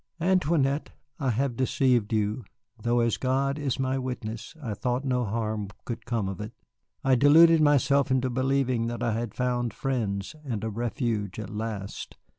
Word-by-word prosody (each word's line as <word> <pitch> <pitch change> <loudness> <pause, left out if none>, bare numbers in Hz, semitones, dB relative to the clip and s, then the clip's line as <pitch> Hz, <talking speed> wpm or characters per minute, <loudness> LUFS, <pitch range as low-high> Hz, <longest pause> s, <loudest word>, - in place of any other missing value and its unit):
"Antoinette, 160 -5 +2 0.3
I 135 - 0
have 125 +2 0
deceived 125 -3 +2
you, 110 +2 0 0.4
though 120 +2 +2
as 115 -1 +1
God 135 +2 0
is 140 -4 -1
my 135 0 0
witness, 125 -1 -5
I 120 -8 -4
thought 125 +5 -2
no 125 -2 +1
harm 110 -1 -2 0.2
could 115 -1 -6
come 115 -4 0
of 95 +1 -5
it. 105 - -6 0.5
I 135 - +3
deluded 155 +5 +7
myself 140 -1 +4
into 130 -1 +1
believing 130 -2 +1
that 120 +1 -3
I 120 - +1
had 115 -1 -3
found 125 -2 -1
friends 110 -6 -2
and 115 -7 -3
a 110 - -2
refuge 115 -3 -2
at 110 -3 -6
last. 105 -2 -5
125 Hz, 165 wpm, -27 LUFS, 110-135 Hz, 0.5 s, deluded